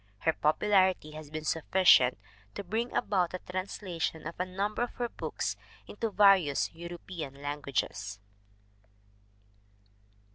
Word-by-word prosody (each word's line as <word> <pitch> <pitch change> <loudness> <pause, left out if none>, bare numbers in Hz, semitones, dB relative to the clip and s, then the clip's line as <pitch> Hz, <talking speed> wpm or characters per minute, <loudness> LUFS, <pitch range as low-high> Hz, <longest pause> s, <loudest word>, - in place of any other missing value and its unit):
Her 160 - +2
popularity 185 +1 +2
has 155 -1 -9
been 155 0 -5
sufficient 160 -5 +4 0.4
to - - -4
bring 225 +6 -2
about 185 -5 +1
the 185 - -4
translation 180 -3 -3
of 165 - -4
a 180 - -1
number 200 +4 -2
of 240 - -2
her 240 -1 -2
books - - -3 0.3
into 225 +2 -3
various 195 -8 +4
European 170 -4 -7
languages. 140 -9 -3
175 Hz, 115 wpm, -30 LUFS, 150-195 Hz, 0.4 s, sufficient